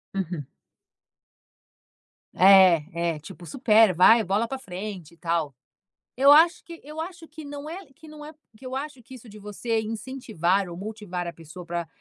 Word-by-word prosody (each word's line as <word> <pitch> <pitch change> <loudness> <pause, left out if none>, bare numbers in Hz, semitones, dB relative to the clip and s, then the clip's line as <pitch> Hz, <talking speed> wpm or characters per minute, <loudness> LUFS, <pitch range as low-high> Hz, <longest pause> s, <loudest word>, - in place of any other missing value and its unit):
Uhum. 175 -7 -4 1.9
É, 175 -3 +5
é. - - -9
Tipo: 165 +3 -12
"Supera, 220 -4 +4
vai 220 +6 +6
bola 205 +5 0
pra 270 - -5
frente 185 - -8
e - - -21
tal". 165 -5 -2 0.6
Eu 275 +3 +6
acho 330 +4 +5
que 335 -1 -11
eu 305 +2 -9
acho 335 -1 -7
que 310 0 -11
não 290 +1 -8
é 370 +2 -8
que 315 +3 -17
não 300 -1 -11
é 310 - -10 0.2
que 260 - -15
eu 255 +1 -5
acho 275 -3 -6
que 260 - -14
isso 240 -3 -13
de 210 - -13
você 210 +2 -3
incentivar 215 -5 -2
ou 170 - -8
motivar 195 -3 -6
a 170 - -6
pessoa 165 +2 -12
pra 170 -1 -4
215 Hz, 175 wpm, -25 LUFS, 175-275 Hz, 1.9 s, vai